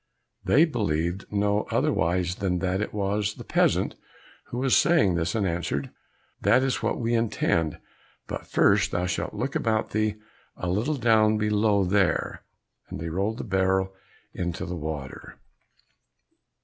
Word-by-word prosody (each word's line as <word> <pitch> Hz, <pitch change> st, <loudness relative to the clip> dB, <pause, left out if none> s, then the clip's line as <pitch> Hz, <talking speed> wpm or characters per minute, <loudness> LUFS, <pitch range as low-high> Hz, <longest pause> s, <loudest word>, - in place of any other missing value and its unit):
They 155 Hz, +4 st, +5 dB
believed 90 Hz, -, -1 dB
no 105 Hz, 0 st, +1 dB
otherwise 85 Hz, +2 st, +1 dB
than 95 Hz, -2 st, 0 dB
that 95 Hz, +3 st, -1 dB
it -, -, -3 dB
was 105 Hz, 0 st, -1 dB
the -, -, -9 dB
peasant -, -, +1 dB, 0.5 s
who 120 Hz, -, -7 dB
was 130 Hz, 0 st, +2 dB
saying 160 Hz, -, +4 dB
this, 85 Hz, +1 st, -1 dB
and 105 Hz, -3 st, +1 dB
answered, 85 Hz, -6 st, -2 dB, 0.5 s
"That 130 Hz, -, +4 dB
is 135 Hz, -2 st, 0 dB
what -, -, 0 dB
we 115 Hz, 0 st, -1 dB
intend, 105 Hz, -8 st, 0 dB, 0.5 s
but -, -, -6 dB
first 100 Hz, 0 st, +3 dB
thou 90 Hz, -1 st, -1 dB
shalt 90 Hz, -, -3 dB
look -, -, -2 dB
about 110 Hz, -1 st, 0 dB
thee 110 Hz, 0 st, 0 dB, 0.4 s
a 90 Hz, -, -3 dB
little 120 Hz, +11 st, 0 dB
down 110 Hz, -3 st, +4 dB
below 105 Hz, -1 st, +2 dB
there," 95 Hz, 0 st, +1 dB, 0.5 s
and -, -, -6 dB
they 80 Hz, +1 st, -4 dB
rolled 100 Hz, +7 st, -1 dB
the -, -, -5 dB
barrel 95 Hz, -1 st, +1 dB
down 95 Hz, -1 st, -11 dB
into 85 Hz, -, -4 dB
the 90 Hz, -, -4 dB
water. 75 Hz, -4 st, -6 dB
100 Hz, 150 wpm, -26 LUFS, 90-110 Hz, 0.5 s, They